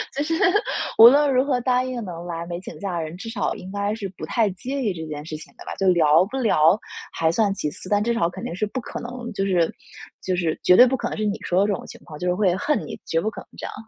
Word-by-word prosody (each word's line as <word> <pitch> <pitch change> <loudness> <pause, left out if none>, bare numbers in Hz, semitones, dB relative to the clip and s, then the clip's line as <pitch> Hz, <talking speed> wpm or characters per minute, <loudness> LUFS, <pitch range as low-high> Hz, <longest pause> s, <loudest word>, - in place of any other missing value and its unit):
就 285 - 0
是 325 +2 -2 0.6
无 230 - +11
论 285 +2 +5
如 255 - +4
何 260 -3 +1
答 250 0 +2
应 255 -2 -4
能 170 -2 -7
来 170 -1 -5
没 175 0 -5
请 - - -9
假 190 -4 -3
的 165 - -2
人， 160 +1 -7
至 225 +5 -7
少 225 -3 -1
应 185 - -9
该 200 +1 -1
是 205 -3 -5
不 - - -5
太 220 +4 +1
介 260 +9 -4
意 215 -6 0
这 160 -2 -6
件 150 -1 -6
事 155 -1 -6
情 - - -13
的 - - -11
吧， - - -6
就 195 - 0
聊 165 -1 +5
不 260 +7 -6
聊 200 -6 +4 0.3
还 160 -1 +1
算 200 +3 +1
其 150 -6 -2
次， 185 - -8
但 205 0 +2
至 235 +2 +1
少 225 -8 +1
肯 185 +2 -9
定 170 - -4
是 215 - -1
不 215 +5 -4
可 - - -7
能 240 0 -7
就 195 0 -1
是 175 -4 +1 0.5
就 185 - 0
是 165 -3 -1
绝 180 - +6
对 250 - +10
不 265 - +1
可 - - -3
能 - - -5
是 215 - -1
你 205 0 -1
说 180 +1 0
的 200 - +2
这 205 - +1
种 - - -5
情 - - -11
况， 155 -3 -10
就 180 - -2
是 180 - +2
会 190 -3 +2
恨 295 +10 0
你， - - -7
绝 165 - 0
不 215 - -1
可 - - -9
能 - - -16
这 - - -6
样。 - - -6
200 Hz, 325 characters per minute, -23 LUFS, 175-235 Hz, 0.6 s, 无